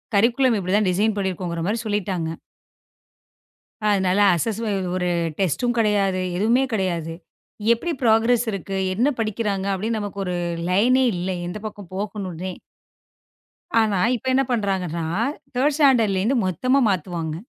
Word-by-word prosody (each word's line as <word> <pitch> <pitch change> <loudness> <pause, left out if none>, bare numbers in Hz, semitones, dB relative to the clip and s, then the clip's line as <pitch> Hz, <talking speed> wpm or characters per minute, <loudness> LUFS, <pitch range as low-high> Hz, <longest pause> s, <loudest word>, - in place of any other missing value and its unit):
Curriculum 235 +2 +3
இப்படி 185 +1 -2
தான் 205 -3 +2
design 210 +4 +1
பண்ணி 190 -1 0
இருக்கோங்குற 170 -2 -4
மாதிரி 220 +2 0
சொல்லிட்டாங்க. 190 -6 -1 1.6
அதனால 190 -1 +2 0.2
அஸ்ஸஸ் 220 +5 -2 0.3
ஒரு 180 -1 0 0.3
டெஸ்ட்டும் 240 - 0
கிடையாது. 200 -3 +2 0.2
எதுவுமே 235 +6 +3
கிடையாது. 170 -5 -1 0.6
எப்படி 340 +9 -3
ப்ரோக்ராஸ் 230 +1 +3
இருக்கு, 195 0 -4 0.2
என்ன 245 +9 +2
படிக்கிறாங்க 210 -3 -1
அப்படின்னு 220 +3 -2
நமக்கு 205 -1 -5
ஒரு 180 -1 -2 0.3
லைனே 245 +8 +4
இல்லை. 180 +1 -2
எந்தப் 210 +4 -6
பக்கம் 205 -4 -8
போகணும்னே. 190 -3 -4 1.3
ஆனா 205 -4 +1 0.2
இப்ப 260 - -7
என்ன 270 +1 +3
பண்றாங்கன்னா 185 -7 -1 0.5
தர்ட் 285 +3 +2
ஸ்டாண்டர்ட்லே 230 -10 +4
இருந்து 255 +4 +2
மொத்தமா 255 - +1
மாத்துவாங்க. 170 -3 -2
200 Hz, 125 wpm, -22 LUFS, 185-225 Hz, 1.6 s, லைனே